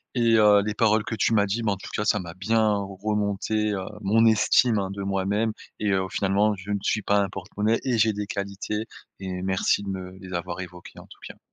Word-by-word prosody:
et 115 -2 +3
heu, 105 -1 +6
les 105 - -1
paroles 110 0 +2
que 115 - -4
tu 115 - +1
m'as 100 -2 +4
dit, 105 +4 -2
bah, 105 -2 +1
en - - -6
tout - - -10
cas 105 - -1
ça 105 - +3
m'a 85 -2 -8
bien 110 +3 +1
remonté, 105 +1 -1
heu, 95 -2 -3 0.2
mon 110 +3 +3
estime, 110 +1 +4
hein, 95 -1 -2
de 100 0 -5
moi-même 100 +3 0 0.3
et 105 -1 +1
heu, 95 -1 +1
finalement, 100 +3 +1
je 95 +2 -8
ne 100 - 0
suis 105 - 0
pas 100 0 +2
un 100 - +1
porte-monnaie 105 +4 -1
et 125 -3 0
j'ai 110 0 +3
des 105 0 -4
qualités 100 +2 -4 0.3
et 95 -1 -5
merci 95 +2 +1
de 100 - -5
me 95 -1 -5
les 95 -1 -9
avoir 85 +1 -4
évoqué, 90 -1 -11
en - - -14
tout - - -16
cas. - - -12
100 Hz, 235 wpm, -25 LUFS, 95-110 Hz, 0.3 s, heu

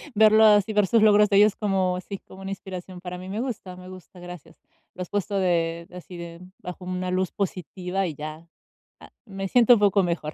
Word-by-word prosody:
Verlo 220 +1 +6
así, 210 0 +4
ver 205 -2 +3
sus 225 +1 +3
logros 210 -1 +5
de 200 - +3
ellos 210 0 +5
como 190 -3 0
sí, 200 - -7
como 190 - -13
una 195 - -6
inspiración 185 -1 -8
para 180 -1 -6
mí, 185 - -9
me 205 +3 -4
gusta 205 -8 -6
me 185 0 -12
gusta, 185 0 -13
gracias. 175 -3 -11 0.4
Lo 185 - -8
has 180 - -12
puesto 205 0 -2
de 170 -2 0
así 180 0 -10
de 170 0 -9 0.2
bajo 180 0 -9
una 180 0 -3
luz 185 0 -1
positiva 185 0 -3
y 155 - -6
ya, 155 +3 -8 0.5
a - - -14 0.2
me 195 -3 -5
siento 245 +3 +5
un 235 - +3
poco 200 -1 +3
mejor. 170 -3 -3
185 Hz, 215 wpm, -24 LUFS, 180-205 Hz, 0.5 s, Verlo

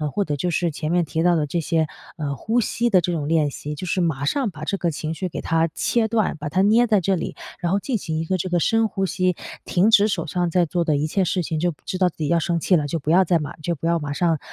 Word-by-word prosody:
或 205 - +2
者 145 -5 -3
就 175 +6 -1
是 170 0 0
前 155 +2 -3
面 175 -1 +3
提 160 +2 -2
到 175 -1 +4
的 150 -2 +1
这 170 +4 -2
些， 160 -1 0 0.3
呃， 145 -4 -3
呼 235 - +1
吸 240 +2 0
的 190 -5 +4
这 175 +1 -1
种 150 -4 -2
练 155 -2 +2
习， 150 +2 -6
就 185 - -6
是 185 +1 -1
马 155 -5 0
上 245 - 0
把 155 -3 -10
这 195 +5 -1
个 175 -3 0
情 155 +1 -4
绪 175 +4 -3
给 175 - -5
它 165 0 +1
切 230 -2 +1
断， 220 -7 0
把 150 0 -5
它 185 +6 +1
捏 225 +4 +4
在 210 -3 +3
这 190 +2 +1
里， 175 - -4 0.2
然 175 - -1
后 200 - +2
进 255 -5 -1
行 160 -4 -4
一 160 - -1
个 185 +3 -1
这 185 - -3
个 175 -2 +1
深 225 0 +2
呼 195 -2 -2
吸， 185 -1 0 0.3
停 190 +5 +3
止 210 -1 +6
手 180 -6 -2
上 175 +2 -1
在 175 +1 +2
做 170 +1 -1
的 155 -3 +2
一 145 - 0
切 185 +4 0
事 180 +1 0
情， 160 -1 -2
就 175 -1 0
知 185 - -4
道 185 -1 +3
自 175 - -5
己 150 - -1
要 170 0 +3
生 170 0 -1
气 180 - +3
了， 145 -2 -1
就 165 - -2
不 150 +1 -2
要 185 +2 +5
再 170 -1 +2
马 150 0 -6
就 170 +3 -2
不 165 - -7
要 170 0 +2
马 145 -1 -4
上， 165 0 +1
170 Hz, 325 characters per minute, -22 LUFS, 155-185 Hz, 0.3 s, 止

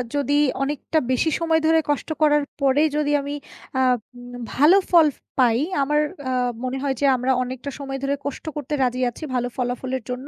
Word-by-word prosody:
যদি 285 0 0 0.3
অনেকটা 295 +3 -2
বেশি 290 +5 +2
সময় 325 -1 +2
ধরে 320 0 +5
কষ্ট 290 +2 -1
করার 295 -1 +4 0.2
পরে 275 +2 +3
যদি 295 -1 +1
আমি 285 +1 -5 0.5
আ - - +3 0.4
উম 245 0 -11
না - - -7 0.2
ভালো 310 +8 +6
ফল 315 -5 +5 0.2
পাই 235 -2 +4 0.2
আমার 295 +2 +1 0.3
আ - - -1 0.3
মনে 255 +1 -2
হয় 275 -1 +1
যে - - +3
আমরা 255 +1 0
অনেকটা 255 +2 -6
সময় 270 -1 -4
ধরে 280 +1 +1
কষ্ট 285 +3 -5
করতে 295 0 -5
রাজি 250 0 0
আছি 240 - -11
ভালো 245 0 0
ফলাফলের 250 0 -2
জন্য। 255 +3 -5
275 Hz, 185 wpm, -22 LUFS, 255-295 Hz, 0.5 s, ভালো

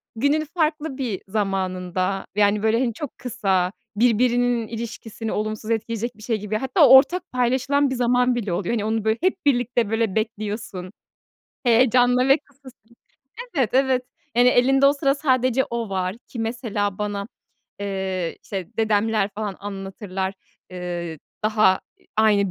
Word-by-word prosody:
günün 285 +6 +1
farklı 305 -3 0
bir 235 -8 -3
zamanında, 190 -2 -1
yani, 205 0 +3
böyle, 220 +1 +3
hani, 240 -3 0
çok 295 +2 -7
kısa, 195 -7 0 0.2
birbirinin 240 0 +2
ilişkisini 225 -1 -6
olumsuz 215 +1 -3
etkileyecek 230 +1 -2
bir 215 - -13
şey 225 -2 0
gibi 210 +1 -2
hatta 275 - +4
ortak 265 +8 +6
paylaşılan 260 +3 +1
bir 260 - -2
zaman 245 0 +2
bile 210 -7 -2
oluyor. 185 +5 -1
Hani, 215 -2 -1
onu, 220 0 0
böyle, 220 +1 +1
hep 370 -2 0
birlikte, 245 -4 +2
böyle, 225 -3 0
bekliyorsun, 210 -4 -3 0.7
heyecanla 250 +1 +4
ve 275 +3 +6
kısa 280 -2 -17
sü 235 -1 -24 0.6
Evet, 250 -6 +2
evet. 260 -1 +3 0.3
Yani, 245 +1 +5
elinde 270 +3 +4
o 280 - +6
sıra 275 -1 +1
sadece 260 -3 +2
o 235 -2 -4
var. 185 +1 -2
Ki 245 - -9
mesela 225 -4 -2
bana, 205 0 -3 0.5
eee, 190 -3 -3
işte, 190 -3 -5
dedemler 215 -1 +1
falan 210 -2 -4
anlatırlar, 195 -1 -5 0.4
eee, 175 -3 -5 0.3
daha 215 -3 +4 0.2
i 370 - -30
aynı 205 -3 +3
225 Hz, 145 wpm, -23 LUFS, 200-250 Hz, 0.7 s, ortak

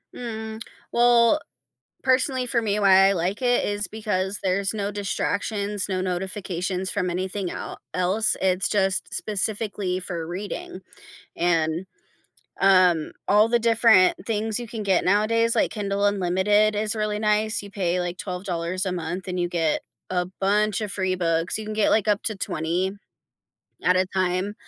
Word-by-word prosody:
Mm, 220 -2 -6 0.3
well, 240 +3 +4 0.6
personally 260 0 +2
for 235 -1 0
me, 210 -2 0
why 195 -1 +6
I - - +3
like 185 +4 -2
it 245 -1 +2
is 205 -1 -1
because 205 -1 -2
there's 195 +2 0
no 205 -1 -2
distractions, 205 0 -2
no 185 -1 -1
notifications 185 0 -3
from 180 - -1
anything 185 +1 -3
el - - -7
else, 185 +5 +1
it's 185 -1 +1
just 195 -2 0
specifically 205 -2 -2
for 170 -3 -5
reading, 185 +1 -6 0.5
and, 165 0 +1 0.7
um, 185 -5 +4 0.2
all 210 +2 +5
the 240 +1 +2
different 225 -5 +4
things 220 0 -1
you 240 - -6
can 220 -1 -5
get 190 -3 +2
nowadays, 225 +4 +2
like - - +2
Kindle 200 -1 -1
Unlimited 205 +2 +2
is 215 +1 -1
really 210 -1 -1
nice; 215 0 +1
you 200 - -9
pay, 180 -3 -1
like, 175 0 -3
$12 180 0 -3
a 185 - -1
month 175 +1 -4
and 180 -1 -3
you 175 - +1
get 165 -3 0 0.3
a 180 -1 0 0.2
bunch 210 +2 +2
of 210 -2 -3
free 190 -2 -1
books, 165 0 0
you 220 - -6
can 215 - -4
get, 215 -1 +2
like, 215 -1 +2
up 210 0 +1
to 220 - -2
20 180 +1 -2 0.9
at 180 - +3
a 185 0 +2
time, 185 +2 0
195 Hz, 160 wpm, -24 LUFS, 185-215 Hz, 0.9 s, why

